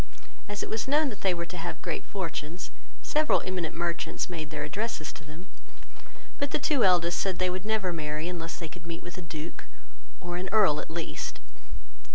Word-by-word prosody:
As 205 0 -1
it - - -3
was 220 +3 0
known 295 +1 +5
that 210 -4 -7
they 190 - +5
were 170 -1 -1
to 180 +1 -6
have 165 -1 -3
great 170 -3 -2
fortunes, 170 -3 -3 0.3
several 305 0 +4
eminent 180 -4 -1
merchants 170 +1 0
made 160 -3 -3
their 150 -2 -2
addresses 200 +1 -2
to - - -10
them; 155 +5 -9 0.9
but 285 - +1
the - - +3
two 275 -3 +3
eldest 175 -2 +5
said 190 -2 +1
they 185 0 +3
would 185 +2 -3
never 210 -5 +2
marry, 155 0 -1
unless 170 -2 -3
they 165 - -4
could 165 +1 -10
meet 170 0 -4
with 175 +1 -6
a - - -4
Duke, 160 -1 -6 0.5
or 175 -1 -3
an 185 +1 -2
Earl 195 -9 +6
at - - -5
least. 165 0 -3
175 Hz, 200 wpm, -30 LUFS, 165-195 Hz, 0.9 s, Earl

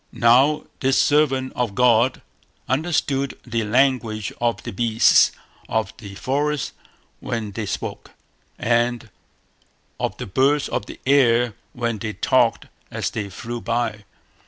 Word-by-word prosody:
Now 130 +6 +4 0.2
this 135 0 +2
servant 135 -3 +2
of 120 -5 -2
God 125 +1 +3 0.4
understood 140 -2 0
the 115 -2 -1
language 115 -3 +1
of 120 -1 0
the - - -5
beasts 115 +2 +4 0.4
of 110 -1 -1
the 100 -4 -10
forest 145 +5 -1 0.5
when 110 -3 -4
they 105 +1 -5
spoke, - - -5 0.5
and 120 -1 0 0.9
of - - -2
the - - -5
birds 140 +8 +2
of - - -3
the - - -10
air 120 -4 +4 0.2
when 115 -3 -2
they 110 +1 -4
talked 120 +4 +2 0.2
as - - -3
they 100 -2 -4
flew 120 +5 -6
by. 115 -3 -2
120 Hz, 130 wpm, -22 LUFS, 110-135 Hz, 0.9 s, Now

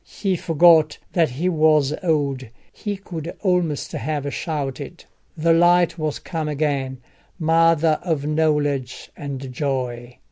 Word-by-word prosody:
He 195 -3 +1
forgot 165 -2 +4 0.2
that 165 -3 +3
he 140 +9 -2
was 155 -4 +3
old: 140 -6 0 0.3
he 205 -2 -4
could 170 -4 -7
almost 180 -6 0
have 145 -2 -3
shouted. 145 -6 -5 0.3
The 165 +1 +3
light 175 0 +3
was 155 -2 -2
come 160 -2 -4
again, 140 -3 -1 0.4
mother 165 -1 +3
of 160 -5 -2
knowledge 150 -4 -1
and 135 -2 -6
joy! 125 -3 -3
155 Hz, 120 wpm, -22 LUFS, 140-165 Hz, 0.4 s, forgot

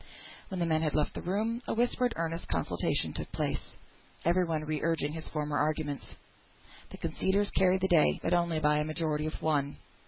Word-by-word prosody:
When 190 -3 -4
the 170 - +2
men 160 -1 +2
had 155 -3 0
left 150 - +1
the - - -5
room, 220 +6 -1
a - - -1
whispered 245 +1 +2
earnest 165 0 -2
consultation 85 -2 0
took - - -5
place, - - -3 0.5
every 175 +2 +4
one 160 -2 -1
re 155 -1 -2
urging 155 -3 0
his 160 -1 -5
former 150 -1 -2
arguments. 150 -1 -2 0.7
The - - -9
conceders 200 +2 0
carried 190 0 +3
the 190 - +2
day, 170 -5 +4
but 170 - +1
only 170 -2 +2
by 150 -1 +3
a - - +1
majority 155 -1 -1
of 155 - -5
one. 145 -3 +1
160 Hz, 190 wpm, -30 LUFS, 150-180 Hz, 0.7 s, every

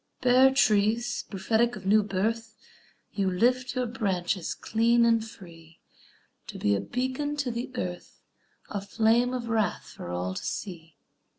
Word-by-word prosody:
Bare 255 +1 +6
trees, 235 -1 +2
prophetic 220 +4 +1
of 200 -3 -10
new 215 +2 +5
birth, 220 +3 -2 0.6
You 195 -2 0
lift 250 +7 +1
your 250 0 0
branches 190 -6 -2
clean 235 +1 +2
and 230 -1 +3
free 165 -7 -14 0.7
To - - -7
be 100 - +1
a - - 0
beacon 260 - -2
to 280 -4 -2
the 240 +3 -4
earth, 180 -4 -6 0.5
A 205 - -3
flame 225 +4 +2
of 250 -2 -4
wrath 220 -4 -1
for 85 - -8
all 90 +1 -3
to - - -6
see. 165 -5 -6
220 Hz, 150 wpm, -27 LUFS, 190-240 Hz, 0.7 s, Bare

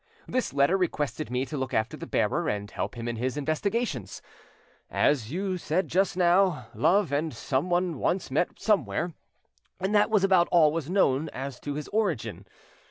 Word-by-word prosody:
This 255 0 -1
letter 140 +7 +3
requested 155 -5 -2
me 125 +2 -1
to 135 - -6
look 130 -2 -3
after 110 0 0
the - - -8
bearer - - 0
and 105 0 -3
help - - -4
him 115 0 -5
in 120 -1 -3
his 130 +4 -2
investigations. 155 - -2 0.7
As 125 -6 +1
you 185 +2 -2
said 170 +4 -1
just 190 0 +1
now, 175 - +3
Love 175 - +2
and 150 +3 0
someone 175 +4 -1
once 180 -6 -1
met 155 +6 0
somewhere, 190 -5 0 0.7
and 190 +3 -1
that 210 +1 +4
was 210 -3 +3
about 185 -3 +4
all 160 -4 +6
was 160 -1 -3
known 160 -6 +2
as 135 -1 -6
to 145 -1 -5
his 150 0 -5
origin. 200 - -2
160 Hz, 170 wpm, -27 LUFS, 135-185 Hz, 0.7 s, all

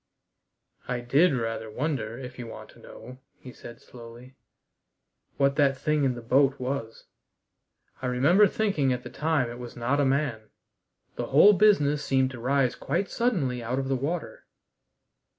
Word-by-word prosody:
"I 125 -1 -3
did 140 +9 +3
rather 115 -2 -3
wonder, 120 -2 -3
if 125 -1 -9
you 120 - -6
want - - -10
to - - -20
know," 130 +1 -12 0.2
he 125 - -12
said 120 - -12
slowly, 120 +2 -14 1.0
"what 140 0 +1
that 140 -2 +3
thing 150 +2 0
in 130 -2 0
the 120 - -9
boat 135 +3 +2
was. 125 -3 -5 1.0
I 130 - -2
remember 150 +12 +4
thinking 185 -10 0
at 125 0 -3
the - - -9
time 155 -5 0
it 120 - -9
was 120 -1 -9
not 125 +5 0
a - - +2
man. 130 -5 -1 0.7
The - - -3
whole 175 +10 +6
business 150 -8 +3
seemed 130 -1 +1
to 125 - -9
rise 130 +1 +1
quite 170 +7 -3
suddenly 165 - -1
out 120 +3 -3
of 135 0 -2
the 135 - +1
water." 150 +6 -5
130 Hz, 165 wpm, -26 LUFS, 125-145 Hz, 1.0 s, whole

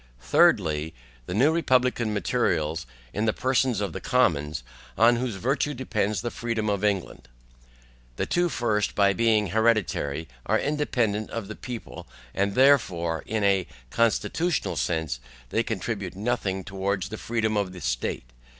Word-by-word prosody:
THIRDLY. 75 +4 +3 0.3
The 90 - -3
new 135 +8 +4
republican 125 -7 +2
materials, 80 - 0 0.3
in 105 - 0
the 110 - +2
persons 130 -4 +1
of 100 - -2
the - - -5
commons, 80 - +1 0.3
on 115 +2 +5
whose 120 -3 -2
virtue 135 +7 0
depends 105 -5 -1
the 120 0 -3
freedom 110 -2 -2
of 100 0 -2
England. 95 -11 -1 0.9
The - - -1
two 175 0 +1
first, 110 -7 0
by 100 -1 +4
being 110 -1 +2
hereditary, 100 -8 +1 0.2
are - - +3
independent 120 -8 0
of 115 -4 -5
the 110 - -7
people; 120 +1 -8 0.3
wherefore 100 - +3
in 110 -1 -1
a 100 -2 +2 0.2
CONSTITUTIONAL 115 +8 +1
SENSE 80 -7 -1 0.3
they - - +1
contribute - - -3
nothing 100 -3 -1
towards 95 0 -2
the 110 - -6
freedom 110 -2 -1
of 100 -3 0
the 90 - -9
state. - - -2
105 Hz, 140 wpm, -26 LUFS, 95-120 Hz, 0.9 s, on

